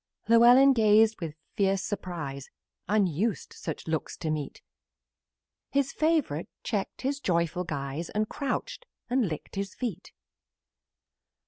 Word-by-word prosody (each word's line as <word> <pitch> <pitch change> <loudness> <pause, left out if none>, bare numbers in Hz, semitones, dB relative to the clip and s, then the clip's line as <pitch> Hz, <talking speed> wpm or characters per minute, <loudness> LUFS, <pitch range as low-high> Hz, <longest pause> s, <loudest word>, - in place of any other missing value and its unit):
Llewellyn 245 +4 +7
gazed 220 -2 +4
with 160 -3 -4 0.2
wild 195 -1 +3
surprise, 160 -10 -5 0.4
Unused 200 0 0
such 160 -1 -6
looks 160 -1 -2
to 160 - -2
meet; 150 -3 -4 1.1
His 275 -1 0
favorite 305 - +1
checked 205 +1 -3
his 275 +2 -1
joyful 170 - 0
guise, 145 +1 -4
And 215 +1 -1
crouched - - -4 0.2
and 250 -4 +2
licked 155 +4 -7
his 195 -1 -3
feet. 210 -7 -5
200 Hz, 115 wpm, -28 LUFS, 165-240 Hz, 1.1 s, Llewellyn